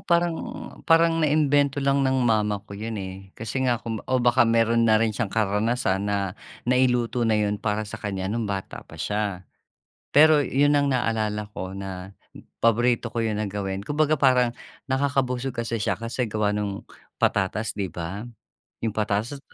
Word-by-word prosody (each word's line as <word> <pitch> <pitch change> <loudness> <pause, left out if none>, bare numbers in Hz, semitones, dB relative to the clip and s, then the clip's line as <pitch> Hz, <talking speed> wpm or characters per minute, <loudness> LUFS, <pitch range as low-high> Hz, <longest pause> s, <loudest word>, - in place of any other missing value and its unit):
parang, 170 -1 +2 0.5
parang 165 0 +4
naimbento 145 -2 +2
lang 140 0 +2
ng 130 0 +2
mama 105 -2 +1
ko 100 - -11
yun, 110 +2 -5
eh. 95 -1 -6 0.2
Kasi 115 +4 -3
nga 120 -2 +1
kung 115 -3 -5
o 130 -1 +1
baka 120 0 +4
meron 115 0 +3
na 110 -1 +4
rin 110 -2 0
siyang 115 -5 -2
karanasan 105 -1 0
na 100 -1 -2 0.3
nailuto 125 -1 +2
na 110 - +2
yun 105 0 0
para 105 +1 -1
sa - - -6
kanya 95 -2 -4
nung 115 +1 -1
bata 100 -2 -5
pa - - -12
siya. 105 -3 -2 0.6
Pero 150 0 +6
yun 145 +3 +3
ang 140 -1 +2
naalala 110 -4 -1
ko 95 0 -5
na 95 -1 -7 0.5
paborito 120 +1 +2
ko 115 0 -2
yun 105 -1 -1
na 105 - -2
gawin. 95 -1 -3
Kumbaga, 150 +5 0
parang 125 -3 +4 0.4
nakakabusog 135 -2 0
kasi 115 -1 -2
siya - - 0
kasi 115 +1 -3
gawa 105 -1 0
nung 105 -1 -3 0.3
patatas, 105 +2 0
di 100 -3 -3
ba? 90 +7 -6 0.6
Yung 110 - 0
patatas, 110 +6 -1
115 Hz, 165 wpm, -25 LUFS, 105-130 Hz, 0.6 s, Pero